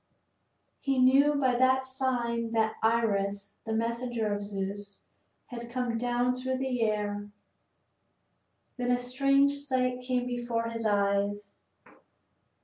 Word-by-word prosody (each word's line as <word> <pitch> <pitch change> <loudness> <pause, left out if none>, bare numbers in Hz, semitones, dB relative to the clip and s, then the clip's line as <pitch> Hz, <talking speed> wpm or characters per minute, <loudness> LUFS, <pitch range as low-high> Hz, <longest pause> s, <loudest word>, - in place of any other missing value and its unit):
He 275 -2 0
knew 275 +3 +5
by 260 -3 +2
that 260 +1 +3
sign 240 -3 -1
that 220 -1 +1
Iris, 200 -3 0
the - - -2
messenger 230 -1 -1
of 205 0 -3
Zeus, 200 0 -5 0.4
had 235 -1 -8
come 245 -1 -2
down 245 +1 +1
through 260 +1 -2
the 260 -2 -2
air. 205 -2 -1 1.5
Then 245 -1 -1
a 245 - +4
strange 275 +3 +3
sight 255 -3 -1
came 250 -1 -1
before 240 -2 -2
his 230 -1 -2
eyes. 200 0 0
240 Hz, 120 wpm, -29 LUFS, 215-255 Hz, 1.5 s, knew